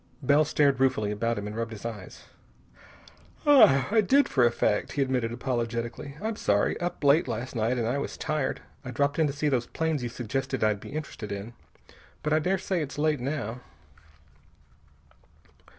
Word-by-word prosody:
Bell 145 Hz, +3 st, +5 dB
stared 145 Hz, -3 st, +2 dB
ruefully 110 Hz, -6 st, +2 dB
about 115 Hz, +2 st, -1 dB
him 100 Hz, -, -4 dB
and 105 Hz, +1 st, -6 dB
rubbed 115 Hz, 0 st, -3 dB
his 110 Hz, 0 st, -10 dB
eyes. 105 Hz, -5 st, -7 dB, 1.2 s
"I 220 Hz, -, +6 dB
did, 275 Hz, +8 st, +4 dB
for 125 Hz, -, +2 dB
a 120 Hz, -, +6 dB
fact," 105 Hz, -3 st, 0 dB
he 145 Hz, -, 0 dB
admitted 125 Hz, -3 st, -1 dB
apologetically. 120 Hz, +2 st, -3 dB
"I'm 220 Hz, +2 st, -3 dB
sorry. 100 Hz, 0 st, +1 dB
Up 175 Hz, -3 st, -4 dB
late 145 Hz, +3 st, +4 dB
last 120 Hz, +4 st, -4 dB
night, 115 Hz, +3 st, 0 dB
and 115 Hz, -2 st, 0 dB
I 130 Hz, +4 st, 0 dB
was -, -, -5 dB
tired. 150 Hz, -4 st, -2 dB, 0.2 s
I 130 Hz, -, -7 dB
dropped 140 Hz, +5 st, 0 dB
in 160 Hz, -, +4 dB
to 140 Hz, -, -3 dB
see 150 Hz, +1 st, -1 dB
those 125 Hz, -4 st, 0 dB
planes 160 Hz, -3 st, -1 dB
you 120 Hz, -, -3 dB
suggested 130 Hz, +2 st, -3 dB
I'd 105 Hz, -1 st, +2 dB
be -, -, -10 dB
interested 140 Hz, -8 st, -6 dB
in. 100 Hz, +4 st, -6 dB, 0.7 s
But 150 Hz, -, +1 dB
I 155 Hz, -, +4 dB
daresay 185 Hz, +1 st, 0 dB
it's 145 Hz, -2 st, -5 dB
late, 150 Hz, -1 st, +1 dB
now." 125 Hz, -3 st, -3 dB
130 Hz, 175 wpm, -27 LUFS, 115-150 Hz, 1.2 s, I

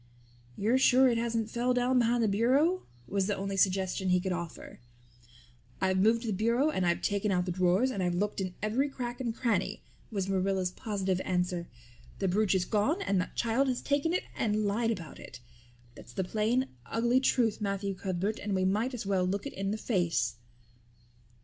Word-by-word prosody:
"You're 230 Hz, +6 st, +2 dB
sure 260 Hz, 0 st, +6 dB
it 235 Hz, -1 st, +1 dB
hasn't 230 Hz, -1 st, -1 dB
fell 245 Hz, +1 st, +1 dB
down 250 Hz, +1 st, +2 dB
behind 235 Hz, 0 st, +2 dB
the -, -, +3 dB
bureau?" 265 Hz, -, +2 dB, 0.2 s
was 195 Hz, -1 st, 0 dB
the 205 Hz, -, 0 dB
only 195 Hz, 0 st, -3 dB
suggestion 190 Hz, -1 st, +1 dB
he 180 Hz, 0 st, +4 dB
could 190 Hz, +1 st, -2 dB
offer. 170 Hz, -2 st, -6 dB, 1.0 s
"I've 190 Hz, -1 st, +1 dB
moved 225 Hz, +4 st, +3 dB
the 225 Hz, -, -2 dB
bureau 235 Hz, +9 st, +2 dB
and 185 Hz, -10 st, 0 dB
I've 170 Hz, -, 0 dB
taken 200 Hz, 0 st, 0 dB
out 180 Hz, -1 st, +1 dB
the 180 Hz, -, -2 dB
drawers 185 Hz, +8 st, +2 dB
and 200 Hz, -, -3 dB
I've 175 Hz, -1 st, 0 dB
looked 205 Hz, +2 st, -1 dB
in 185 Hz, -2 st, -4 dB
every 250 Hz, +7 st, +1 dB
crack 245 Hz, -2 st, -5 dB
and 240 Hz, -3 st, -1 dB
cranny" 215 Hz, -4 st, -1 dB, 0.3 s
was 195 Hz, -4 st, -2 dB
Marilla's 190 Hz, -1 st, 0 dB
positive 190 Hz, -2 st, -2 dB
answer. 180 Hz, -1 st, -1 dB, 0.5 s
"The 195 Hz, -, -1 dB
brooch 195 Hz, +1 st, +2 dB
is 185 Hz, -1 st, +1 dB
gone 220 Hz, -, +1 dB
and 195 Hz, -2 st, +1 dB
that -, -, -7 dB
child 235 Hz, +4 st, +1 dB
has 255 Hz, -2 st, 0 dB
taken 290 Hz, +3 st, +1 dB
it 360 Hz, -, 0 dB
and 215 Hz, -1 st, 0 dB
lied 225 Hz, +3 st, +1 dB
about 185 Hz, -8 st, -5 dB
it. 120 Hz, -, -10 dB, 0.5 s
That's -, -, -13 dB
the 190 Hz, -, -1 dB
plain, 225 Hz, +7 st, 0 dB, 0.2 s
ugly 235 Hz, +3 st, +2 dB
truth, 235 Hz, -5 st, +1 dB
Matthew 200 Hz, -1 st, -1 dB
Cuthbert, 190 Hz, +2 st, -2 dB
and 205 Hz, -1 st, -2 dB
we 185 Hz, 0 st, +1 dB
might 220 Hz, +7 st, 0 dB
as 225 Hz, -, -5 dB
well 195 Hz, -2 st, +1 dB
look 195 Hz, +5 st, -1 dB
it 280 Hz, -, -5 dB
in 195 Hz, 0 st, -3 dB
the 210 Hz, -, -1 dB
face." 165 Hz, -, 0 dB
205 Hz, 195 wpm, -30 LUFS, 185-235 Hz, 1.0 s, sure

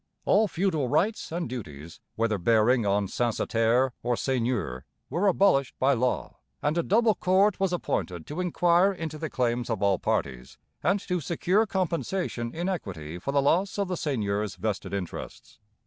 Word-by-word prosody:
All 215 Hz, +1 st, +4 dB
feudal 170 Hz, -8 st, 0 dB
rights 175 Hz, -, 0 dB
and 170 Hz, +1 st, -2 dB
duties, 85 Hz, -, -8 dB, 0.2 s
whether 110 Hz, -2 st, 0 dB
bearing 115 Hz, +4 st, +3 dB
on 100 Hz, +1 st, +2 dB
censitaire 120 Hz, +3 st, +1 dB
or 120 Hz, 0 st, 0 dB
seigneur, 115 Hz, -, -1 dB, 0.3 s
were 190 Hz, +4 st, +1 dB
abolished 180 Hz, -9 st, +3 dB
by 135 Hz, +2 st, +3 dB
law, 125 Hz, 0 st, -1 dB, 0.2 s
and 150 Hz, +2 st, 0 dB
a 170 Hz, -, +2 dB
double 220 Hz, +5 st, +3 dB
court 190 Hz, +2 st, +2 dB
was 195 Hz, -2 st, +1 dB
appointed 90 Hz, -, -2 dB
to 155 Hz, +5 st, -4 dB
inquire 175 Hz, +1 st, +3 dB
into 160 Hz, -5 st, -6 dB
the 160 Hz, 0 st, -3 dB
claims 120 Hz, -2 st, -1 dB
of 110 Hz, -3 st, -1 dB
all 100 Hz, -2 st, +3 dB
parties 65 Hz, -1 st, -2 dB, 0.2 s
and 195 Hz, +2 st, +2 dB
to 180 Hz, -2 st, -2 dB
secure 180 Hz, +8 st, +1 dB
compensation 175 Hz, -, -2 dB
in 175 Hz, +6 st, -3 dB
equity 90 Hz, -, -4 dB
for 135 Hz, -, -3 dB
the 140 Hz, -1 st, +2 dB
loss 185 Hz, +9 st, +2 dB
of 200 Hz, -2 st, -1 dB
the 180 Hz, -, -1 dB
seigneurs' 105 Hz, -, -2 dB
vested 100 Hz, +2 st, -3 dB
interests. 95 Hz, -3 st, -6 dB
135 Hz, 165 wpm, -27 LUFS, 110-180 Hz, 0.3 s, All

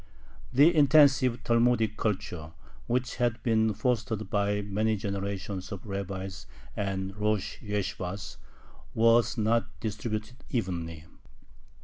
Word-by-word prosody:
The 145 Hz, +7 st, +6 dB
intensive 135 Hz, -4 st, +5 dB
Talmudic 115 Hz, -2 st, +2 dB
culture, 90 Hz, -7 st, -3 dB, 0.3 s
which 125 Hz, 0 st, -1 dB
had 120 Hz, -2 st, 0 dB
been 110 Hz, -2 st, +3 dB
fostered 110 Hz, -5 st, -1 dB
by 105 Hz, 0 st, +1 dB
many 105 Hz, +2 st, 0 dB
generations 100 Hz, -1 st, -4 dB
of 100 Hz, +1 st, -7 dB
rabbis 95 Hz, -, -5 dB, 0.3 s
and 95 Hz, -1 st, -3 dB
rosh 105 Hz, -1 st, -1 dB
yeshibahs 100 Hz, -2 st, -4 dB, 0.6 s
was 115 Hz, +2 st, +4 dB
not 115 Hz, +2 st, +2 dB
distributed 110 Hz, +2 st, -4 dB
evenly. 85 Hz, -8 st, -3 dB
105 Hz, 100 wpm, -29 LUFS, 100-115 Hz, 0.6 s, The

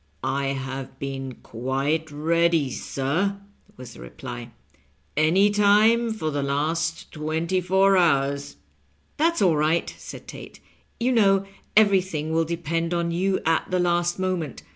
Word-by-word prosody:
" 70 Hz, -, -40 dB, 0.2 s
I -, -, -1 dB
have 135 Hz, -1 st, -5 dB
been 135 Hz, -2 st, -5 dB
quite 135 Hz, +7 st, -2 dB
ready, 165 Hz, -1 st, +1 dB
sir," 165 Hz, +13 st, -1 dB, 0.4 s
was 125 Hz, -1 st, -10 dB
the -, -, -14 dB
reply, -, -, -8 dB, 0.3 s
" 70 Hz, 0 st, -38 dB, 0.2 s
any 175 Hz, +7 st, +4 dB
time 215 Hz, +3 st, +4 dB
for 160 Hz, -8 st, -3 dB
the 145 Hz, -1 st, -1 dB
last 160 Hz, +4 st, -1 dB
twenty 160 Hz, +4 st, -1 dB
four 190 Hz, +2 st, +3 dB
hours." 140 Hz, -, +1 dB, 0.3 s
" -, -, -40 dB
That's 330 Hz, -4 st, +2 dB
all 175 Hz, -4 st, +4 dB
right," 155 Hz, +3 st, +1 dB
said -, -, -10 dB
Tate; -, -, -10 dB, 0.4 s
"you 245 Hz, +2 st, +1 dB
know 195 Hz, -5 st, +3 dB, 0.3 s
everything 185 Hz, -7 st, +3 dB
will 165 Hz, 0 st, +2 dB
depend 165 Hz, +1 st, -2 dB
on 170 Hz, 0 st, -1 dB
you 190 Hz, +3 st, 0 dB
at 165 Hz, 0 st, +1 dB
the 185 Hz, -, 0 dB
last 175 Hz, 0 st, +1 dB
moment. 185 Hz, -7 st, -3 dB
165 Hz, 145 wpm, -24 LUFS, 140-190 Hz, 0.4 s, any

